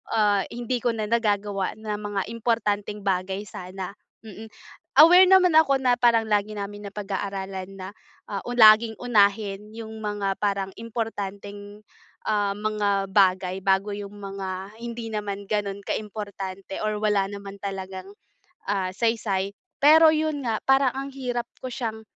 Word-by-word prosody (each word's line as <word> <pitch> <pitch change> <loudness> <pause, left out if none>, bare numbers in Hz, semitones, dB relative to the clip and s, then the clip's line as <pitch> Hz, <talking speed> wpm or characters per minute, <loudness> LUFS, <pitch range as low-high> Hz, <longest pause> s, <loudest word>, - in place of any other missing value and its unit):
ah, 205 -3 +3
hindi 240 +1 -2
ko 235 0 0
na 220 - -2
nagagawa 205 -4 0
ng 220 0 -8
mga 205 -1 -2
importanteng 210 -3 -1
bagay 190 +1 -1
sana, 185 -1 -7 0.3
mm. 220 0 -10 0.5
Aware 350 +4 +9
naman 365 -3 +6
ako 280 -4 +5
na 250 -2 +3
parang 235 -2 +3
lagi 210 0 +1
namin 205 0 -6
napag-aaralan 195 -1 -5
na, 185 - -6 0.4
uh, 200 -2 -4
laging 220 -1 +7
unahin 210 -3 +1
yung 220 -1 -8
mga 205 -2 -1
parang 200 -2 0
importanteng, 205 -2 -6 0.5
ah, 205 -2 +1
mga 205 -2 0
bagay 190 -1 +2
bago 195 +1 +1
yung 205 0 -8
mga 195 0 -6
hindi 235 -1 -5
naman 205 -2 -4
ganon 200 -1 -2
ka-importante 195 -3 -5
or 215 -1 -1
wala 210 -2 +2
naman 200 -1 -8
talagang, 190 -1 -6 0.6
ah, 195 -2 0
saysay. 210 -4 0 0.3
Pero 320 +2 +8
yun 310 -1 0
nga 225 -2 0
parang 270 -1 +4
ang 275 +1 -4
hirap 250 -3 -3
ko 255 - -4
siyang, 230 -4 -4
205 Hz, 140 wpm, -25 LUFS, 195-230 Hz, 0.6 s, Aware